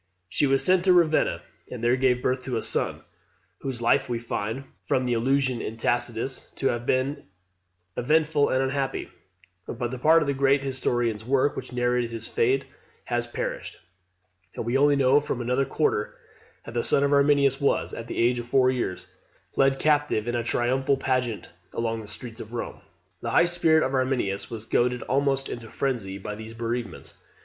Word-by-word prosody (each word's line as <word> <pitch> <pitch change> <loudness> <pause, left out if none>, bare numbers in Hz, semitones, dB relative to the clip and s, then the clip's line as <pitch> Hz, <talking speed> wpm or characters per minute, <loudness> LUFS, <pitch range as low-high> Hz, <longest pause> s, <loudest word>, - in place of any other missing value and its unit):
She 145 - +2
was 135 0 +2
sent 185 -1 +4
to 185 - +6
Ravenna, 165 -3 +2 0.3
and 120 -2 -7
there 120 +1 +4
gave 125 -1 +1
birth 130 0 0
to 125 -3 -2
a 110 - -3
son, - - 0 0.6
whose 130 -3 -5
life 135 +3 +3
we 120 - -1
find, 115 +2 -4 0.2
from 130 -1 0
an 120 - +1
allusion 130 +1 +1
in 110 - -5
Tacitus, 120 +2 -2
to 135 - +1
have 120 0 -3
been 130 +3 0 0.7
eventful 150 +2 +2
and 130 +1 +2
unhappy; 135 0 -2 0.6
but 120 0 -3
the 130 - -5
part 160 +4 +5
of - - -4
the 140 - +1
great 135 0 +2
historian's 120 -5 -1
work 135 +4 +1
which - - -7
narrated 125 -1 0
his 115 -1 -5
fate 130 +3 +1 0.4
has - - -1
perished, - - -5 0.8
and - - -4
we 120 +2 -1
only 145 +1 +4
know 135 +1 +4
from 145 -4 -4
another 125 +3 0
quarter 135 -6 -1 0.5
that 115 - -8
the 120 - 0
son 140 - +4
of 140 0 +2
Arminius 140 -1 +3
was, 140 - +1
at 115 - -6
the - - -6
age 120 +1 +2
of 120 - -6
four 130 0 +4
years, 120 -8 -3 0.5
led 135 0 +3
captive 145 -7 +1
in 120 - -1
a 120 -1 -1
triumphal 130 +4 +1
pageant 125 -5 -1 0.3
along 115 -1 -2
the 105 - -10
streets 115 +3 -5
of 110 +2 -10
Rome. 120 - -5 0.4
The - - -3
high - - +5
spirit 160 -2 +3
of 130 - -3
Arminius 130 -7 -1
was 115 -2 -7
goaded 125 +1 +1
almost 135 0 0
into 115 -2 -7
frenzy 115 -8 -2
by 100 +2 -6
these 110 +2 -9
bereavements. 115 -4 -5
130 Hz, 185 wpm, -26 LUFS, 120-140 Hz, 0.8 s, to